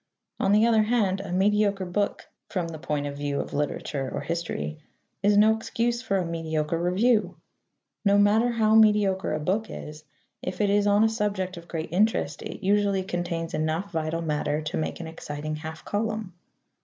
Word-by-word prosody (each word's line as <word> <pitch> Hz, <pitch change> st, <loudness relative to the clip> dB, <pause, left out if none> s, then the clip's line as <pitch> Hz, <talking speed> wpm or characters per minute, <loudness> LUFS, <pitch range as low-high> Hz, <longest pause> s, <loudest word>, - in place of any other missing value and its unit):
On 195 Hz, -, +2 dB
the 210 Hz, +2 st, +5 dB
other 225 Hz, -2 st, +4 dB
hand, 210 Hz, -4 st, +1 dB
a 195 Hz, -2 st, -6 dB
mediocre 200 Hz, +1 st, +2 dB
book 200 Hz, +3 st, -2 dB, 0.2 s
(from 175 Hz, -4 st, -2 dB
the 160 Hz, -1 st, -7 dB
point 150 Hz, -2 st, -2 dB
of 140 Hz, 0 st, -4 dB
view 145 Hz, 0 st, -2 dB
of -, -, -5 dB
literature 140 Hz, -2 st, -2 dB
or -, -, -3 dB
history) 165 Hz, -, -3 dB, 0.4 s
is 205 Hz, +1 st, +4 dB
no 215 Hz, +1 st, +6 dB
excuse 235 Hz, +1 st, -1 dB
for 195 Hz, -5 st, 0 dB
a 185 Hz, -, 0 dB
mediocre 165 Hz, -1 st, -2 dB
review. 185 Hz, 0 st, +2 dB, 0.7 s
No 200 Hz, -1 st, +4 dB
matter 210 Hz, +4 st, +4 dB
how 220 Hz, -2 st, +3 dB
mediocre 210 Hz, -3 st, +4 dB
a 155 Hz, -, -1 dB
book 200 Hz, +8 st, -1 dB
is, 150 Hz, 0 st, -8 dB, 0.4 s
if 185 Hz, -, -5 dB
it 205 Hz, -2 st, +2 dB
is 205 Hz, 0 st, +3 dB
on 205 Hz, +1 st, +5 dB
a -, -, +5 dB
subject 205 Hz, -4 st, -1 dB
of 170 Hz, 0 st, -11 dB
great 160 Hz, -2 st, -4 dB
interest, 180 Hz, -6 st, +1 dB
it -, -, -7 dB
usually 200 Hz, -1 st, +2 dB
contains 175 Hz, -2 st, -3 dB
enough 160 Hz, +5 st, -1 dB
vital 160 Hz, 0 st, -2 dB
matter 150 Hz, -1 st, -1 dB
to 155 Hz, +4 st, -3 dB
make 155 Hz, -, -2 dB
an 170 Hz, -, -5 dB
exciting 155 Hz, -1 st, -5 dB
half 160 Hz, +1 st, -8 dB
column. 215 Hz, -2 st, -2 dB
185 Hz, 180 wpm, -26 LUFS, 160-210 Hz, 0.7 s, no